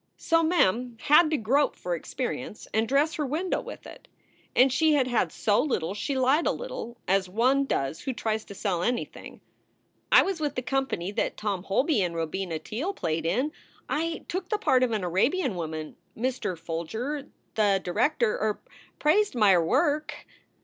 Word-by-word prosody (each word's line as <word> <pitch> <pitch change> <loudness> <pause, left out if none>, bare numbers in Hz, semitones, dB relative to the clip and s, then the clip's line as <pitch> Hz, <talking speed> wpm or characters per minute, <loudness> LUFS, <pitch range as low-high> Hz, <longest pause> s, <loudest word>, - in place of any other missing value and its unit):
So 330 0 +2
Mem 250 - +2
had 305 +2 +6
to 310 - +1
grope 275 +6 +2
for 180 - -4
experience 250 +6 -5
and 220 +1 +2
dress 290 +4 +2
her 300 - -2
window 335 +7 -1
with - - -10
it. - - -12 0.5
And 255 +1 +5
she 310 +3 +3
had 270 -3 +3
had 245 -3 +1
so 210 +1 +2
little 195 - -1
she 265 +6 -2
lied 265 +5 +3
a - - +3
little, 240 - -6
as 190 0 +2
one 255 +7 +2
does 135 - -2
who 265 - -2
tries 220 -3 -2
to 200 - -10
sell 185 -4 -1
anything: 240 +5 -3 0.7
"I - - +8
was 385 -3 -2
with 290 -2 -1
the 255 - -2
company 260 -9 -1
that 215 - -2
Tom 205 -4 -2
Holby 260 - +2
and 175 -2 -1
Robina 165 +1 -2
Teele 270 - -4
played 165 -1 -2
in. 255 - 0 0.4
I 330 +1 -2
took 365 0 -4
the 425 - +1
part 255 -10 +3
of 255 - +3
an 215 -4 -1
Arabian 240 - +1
woman. 160 -3 -5 0.2
Mr. 240 -6 -2
Folger, 220 - -4 0.3
the 205 -3 +3
director 235 - +1
er 215 -1 0 0.4
praised 370 +4 +2
my 210 -4 +5
er 175 -2 +4
work." 290 - +1
245 Hz, 175 wpm, -27 LUFS, 195-290 Hz, 0.7 s, I